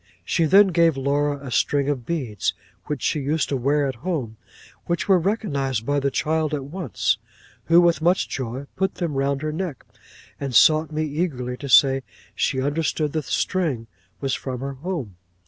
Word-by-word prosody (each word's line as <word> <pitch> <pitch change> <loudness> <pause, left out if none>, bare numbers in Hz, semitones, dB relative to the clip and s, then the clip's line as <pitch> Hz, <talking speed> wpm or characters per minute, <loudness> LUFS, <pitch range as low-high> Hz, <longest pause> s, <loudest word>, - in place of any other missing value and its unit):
'She 165 - +1
then 195 +5 +6
gave 165 -4 +3
Laura 145 +2 0
a 130 - -6
string 140 +3 +1
of 130 -5 -2
beads 125 - -2 0.3
which 150 -4 -4
she 155 - +1
used 150 +3 0
to 140 - 0
wear 140 +3 +1
at 135 -3 -3
home, 145 -11 -3 0.5
which 170 0 -1
were 190 -2 +5
recognised 140 - -1
by 145 +2 +1
the 140 0 +1
child 155 +2 0
at 140 - -4
once, 160 - -1 0.5
who, 165 +1 +6
with 170 -2 +3
much 175 +3 +2
joy, 130 +1 -4
put 190 0 -1
them 170 -5 -3
around 140 +1 0
her 155 - -1
neck, 165 -5 -4 0.5
and 135 -3 -4
sought 155 +7 +5
me 155 +1 -1
eagerly 145 -5 -2
to 140 +2 -8
say 135 +1 +6 0.3
she 130 - 0
understood 150 +1 -1
the 155 - 0
string 150 -4 -1 0.3
was 135 -1 -1
from 130 -2 -4
her 140 0 -4
home. 135 - -5
145 Hz, 180 wpm, -23 LUFS, 135-165 Hz, 0.5 s, then